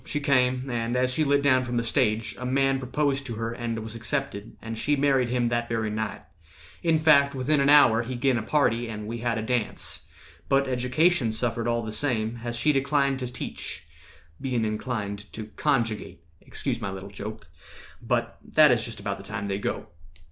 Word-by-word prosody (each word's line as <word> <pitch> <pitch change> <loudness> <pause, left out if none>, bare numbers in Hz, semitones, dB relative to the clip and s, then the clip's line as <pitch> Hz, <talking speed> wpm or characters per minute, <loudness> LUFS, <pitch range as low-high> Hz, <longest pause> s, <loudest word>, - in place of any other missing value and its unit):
She 150 - -3
came; 130 -2 +2
and 120 -1 -2
as 130 0 +1
she 155 - +2
lit 140 -1 +2
Down 130 -2 +4
from 120 -1 -2
the 120 - +1
stage, 110 -1 0
a - - -6
man 135 +1 +2
proposed 135 +2 0
to 115 - -4
her 115 +1 -3
And 120 -1 -3
was 110 0 -7
accepted, 115 -3 -4
and 115 0 -6
she 145 +6 +1
married 135 -3 +2
him 120 -1 +1
That 120 0 -1
very 110 -2 -1
night; 105 -6 -3 0.6
in 165 -2 +3
fact, 145 -3 +5
within 140 +3 +1
an 140 - +3
hour 125 -6 +7
He 125 +2 -5
gin 130 +1 +2
a - - -3
party, 120 -2 +1
and 105 -1 -5
we 115 +2 -5
had 120 0 -1
a 110 - -2
dance; 115 -2 -3 0.4
But 135 0 +3
Education 125 +2 +2
suffered 115 +1 -1
all 115 0 0
the 110 - -5
same, 115 -1 0
As 120 0 -3
she 150 +5 +3
declined 140 -1 +1
to 125 -2 -4
teach, 125 - -6 0.6
bein' 125 -4 0
inclined 105 -2 -4
To 110 -1 -7
conjugate—excuse 115 -7 -2
my 100 - -2
little 95 +1 -7
joke; 105 -1 -7 0.6
But - - -1
that 155 -3 +5
is 120 -2 +3
just 115 -3 -4
about 100 -1 -3
the - - -9
time 100 +1 -4
they 100 0 -2
go. - - -3
120 Hz, 195 wpm, -26 LUFS, 110-135 Hz, 0.6 s, hour